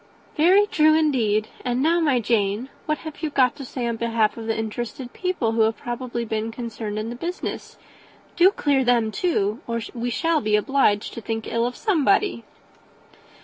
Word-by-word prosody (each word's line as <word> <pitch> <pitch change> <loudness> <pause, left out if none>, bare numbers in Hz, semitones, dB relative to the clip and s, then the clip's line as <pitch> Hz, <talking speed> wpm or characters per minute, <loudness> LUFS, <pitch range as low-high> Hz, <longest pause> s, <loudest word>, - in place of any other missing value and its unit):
"Very 370 +6 +5
true, 310 -6 +4
indeed; 230 -9 +2 0.2
and 245 0 -1
now, 330 +5 +3
my 300 -5 +2
dear 240 - 0
Jane, 205 +4 -1 0.2
what 305 0 +1
have 315 - -8
you 315 - -1
got 260 -4 +2
to 280 - -7
say 250 -1 -4
in 235 -1 -2
behalf 225 -2 +1
of 225 -1 -7
the 225 - 0
interested 240 +3 -5
people 365 -11 -1
who 225 0 +1
have 220 0 +2
probably 240 0 -4
been 220 0 -2
concerned 225 -3 -5
in 215 +2 -3
the - - -6
business? 345 +8 -5 0.6
Do 355 +2 +6
clear 285 -8 +1
them, 235 -3 +2
too, 215 - 0
or 230 0 -1
we 240 0 -3
shall 325 +5 +1
be 215 -1 +2
obliged 210 -2 +1
to 230 - -7
think 225 +1 -4
ill 230 +1 0
of 245 - -5
somebody." 395 - +1
240 Hz, 190 wpm, -23 LUFS, 225-305 Hz, 0.6 s, Do